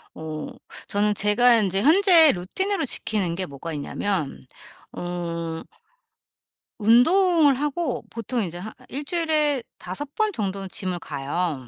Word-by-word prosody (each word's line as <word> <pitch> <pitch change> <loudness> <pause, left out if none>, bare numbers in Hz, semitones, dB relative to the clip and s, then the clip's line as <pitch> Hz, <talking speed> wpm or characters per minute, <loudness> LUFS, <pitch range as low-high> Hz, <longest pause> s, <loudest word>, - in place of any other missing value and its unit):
어 155 -1 -6 0.4
저는 210 +1 +2
제가 215 +4 +4
인제 195 -2 +1
현재 335 0 +6
루틴으로 380 - -2
지키는게 190 -7 -2
뭐가 150 +2 -7
있냐면 150 0 -3 0.5
어 170 -2 -4 1.2
운동을 305 - +5
하고 295 +1 -2
보통 230 +1 -3
인제 175 -4 -4
한 205 +5 -7 0.2
1 280 +3 -4
주일에 310 -4 +1 0.2
5 275 +11 -6
번 430 -1 +1
정도는 195 - -4
gym을 185 -1 -2
가요. 145 -1 -3
210 Hz, 235 characters per minute, -24 LUFS, 175-290 Hz, 1.2 s, 현재